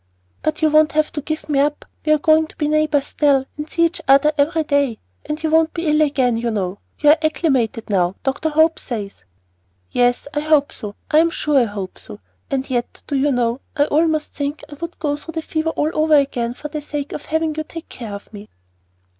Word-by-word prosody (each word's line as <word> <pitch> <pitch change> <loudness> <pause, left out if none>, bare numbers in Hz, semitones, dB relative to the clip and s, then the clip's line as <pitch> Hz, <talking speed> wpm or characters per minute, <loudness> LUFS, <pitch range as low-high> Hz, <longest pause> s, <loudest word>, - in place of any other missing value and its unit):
"But 310 +1 -2
you 310 - +4
won't 310 +1 +4
have 310 0 +1
to 295 - -4
give 310 +2 -4
me 290 -2 +1
up; 295 +1 0 0.2
we 305 - +1
are 305 - +6
going 315 +1 +3
to - - -17
be 300 - -1
neighbors 300 -2 +2
still, 280 -3 +2
and 300 +1 -6
see 335 - +2
each 335 +1 -2
other 275 +3 +6
every 315 +3 +2
day. 285 -6 +1 0.3
And 305 +1 -4
you 315 - 0
won't 320 0 +3
be 340 0 -3
ill 305 0 +3
again, 265 -6 +2
you 235 +1 -1
know. 200 -3 -2 0.2
You 295 -1 +5
are 310 - +4
acclimated 270 -8 0
now, 185 -2 +1
Dr. 275 +4 -1
Hope 315 +1 +3
says." 205 - -6 0.7
"Yes 245 +2 +2
I 295 - 0
hope 300 -1 +2
so; 205 -3 -7 0.2
I 305 - +6
am 335 +1 +4
sure 300 -3 +1
I 245 - +3
hope 200 -3 -6
so. 105 - -11 0.3
And 270 0 -1
yet, 245 -2 -3
do 285 - -3
you 280 +2 +2
know, 240 -1 0 0.2
I 290 - +4
almost 310 0 +1
think 285 +1 -4
I 300 - -11
would 335 0 -5
go 290 -2 -1
through 325 +2 -9
the 320 - -3
fever 315 +1 -1
all 310 -1 -1
over 310 0 +3
again 245 -4 +1
for 300 - -6
the 300 0 -4
sake 290 -1 -5
of 295 - -6
having 320 0 0
you 310 +1 -3
take 330 +1 -9
care 220 -5 -7
of 200 - -12
me!" 205 0 -10
295 Hz, 230 wpm, -20 LUFS, 255-310 Hz, 0.7 s, are